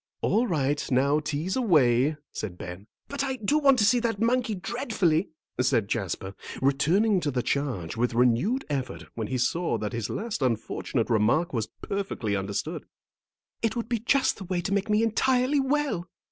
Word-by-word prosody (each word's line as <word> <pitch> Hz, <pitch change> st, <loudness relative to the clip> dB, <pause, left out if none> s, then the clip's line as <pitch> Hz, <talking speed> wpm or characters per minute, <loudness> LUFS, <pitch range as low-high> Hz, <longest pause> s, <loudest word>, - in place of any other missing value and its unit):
"All 240 Hz, +3 st, +2 dB
right, 145 Hz, -5 st, 0 dB
now 140 Hz, +3 st, +3 dB
tease 155 Hz, +4 st, -2 dB
away," 150 Hz, -, +3 dB
said 95 Hz, -5 st, -5 dB
Ben. 95 Hz, +1 st, -8 dB, 0.2 s
"But 280 Hz, -1 st, -2 dB
I 265 Hz, -1 st, -1 dB
do 260 Hz, +6 st, +1 dB
want 275 Hz, -3 st, +5 dB
to 210 Hz, -, +4 dB
see 245 Hz, +3 st, +4 dB
that 230 Hz, -3 st, -1 dB
monkey 230 Hz, -1 st, +1 dB
dreadfully," 195 Hz, -, 0 dB, 0.3 s
said 120 Hz, -5 st, +2 dB
Jasper, 95 Hz, -2 st, -3 dB, 0.3 s
returning 170 Hz, +10 st, +3 dB
to 155 Hz, -4 st, -1 dB
the 125 Hz, -3 st, -1 dB
charge 125 Hz, -, -2 dB
with 120 Hz, +1 st, 0 dB
renewed 125 Hz, -, +2 dB
effort 135 Hz, -3 st, -3 dB
when 110 Hz, -2 st, -4 dB
he 130 Hz, -, -2 dB
saw 125 Hz, +2 st, 0 dB
that 105 Hz, -1 st, -4 dB
his 115 Hz, -1 st, -3 dB
last 215 Hz, -4 st, -3 dB
unfortunate 120 Hz, -1 st, -1 dB
remark 115 Hz, +11 st, +2 dB
was 110 Hz, -3 st, -1 dB
perfectly 190 Hz, -, -3 dB
understood; 100 Hz, 0 st, -3 dB, 0.7 s
"it 225 Hz, -1 st, 0 dB
would 230 Hz, -1 st, -3 dB
be 235 Hz, -2 st, 0 dB
just 265 Hz, +5 st, +2 dB
the 195 Hz, -, -8 dB
way 180 Hz, 0 st, -1 dB
to 195 Hz, +3 st, -2 dB
make 200 Hz, +1 st, 0 dB
me 210 Hz, +1 st, +3 dB
entirely 255 Hz, +5 st, +2 dB
well." 270 Hz, -10 st, 0 dB
165 Hz, 175 wpm, -27 LUFS, -, 0.7 s, want